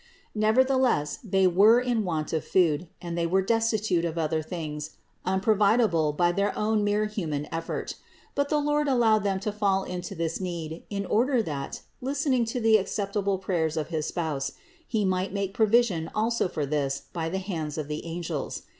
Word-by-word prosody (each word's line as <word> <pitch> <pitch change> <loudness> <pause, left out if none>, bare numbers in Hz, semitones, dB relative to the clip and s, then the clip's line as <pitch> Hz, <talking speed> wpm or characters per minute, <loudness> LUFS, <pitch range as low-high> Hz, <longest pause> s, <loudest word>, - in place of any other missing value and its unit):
634. 255 +5 +3
Nevertheless, 150 - +1
they 195 -3 +2
were 200 +6 +6
in 245 -3 0
want 160 -5 -2
of 160 - 0
food, 170 -2 +2 0.2
and 170 -1 -4
they 170 -1 0
were 190 +3 +2
destitute 220 -4 +1
of 170 -1 -2
other 160 -1 0
things 155 -2 -6 0.3
unprovidable 195 -3 +3
by 175 +3 +2
their 200 +3 0
own 215 0 +1
mere 205 +1 +1
human 160 -9 -3
effort. 165 0 -3 0.4
But 285 0 0
the 300 - +2
Lord 295 0 +1
allowed 235 -5 +4
them 195 -1 0
to 210 - -2
fall 200 -2 +1
into 180 -1 -5
this 165 +2 -2
need 170 -3 -4
in 200 -1 -3
order 245 +4 +2
that, 140 -6 -5 0.2
listening 270 -2 +1
to 230 +2 -3
the 225 -1 +5
ac 195 - -4
ceptable 200 -1 -1
prayers 165 -4 -1
of 155 - -2
his 155 -3 -2
Spouse, 145 -5 -2 0.3
He 215 -3 0
might 185 0 0
make 200 -1 -2
provi 225 +3 +5
sion 165 -8 -3
also 225 0 +1
for 155 -5 -3
this 140 -1 -1
by 165 -2 -2
the 190 - -2
hands 165 -6 -4
of 155 -2 -3
the 150 0 -4
angels. 165 -3 -4
190 Hz, 185 wpm, -27 LUFS, 160-220 Hz, 0.4 s, were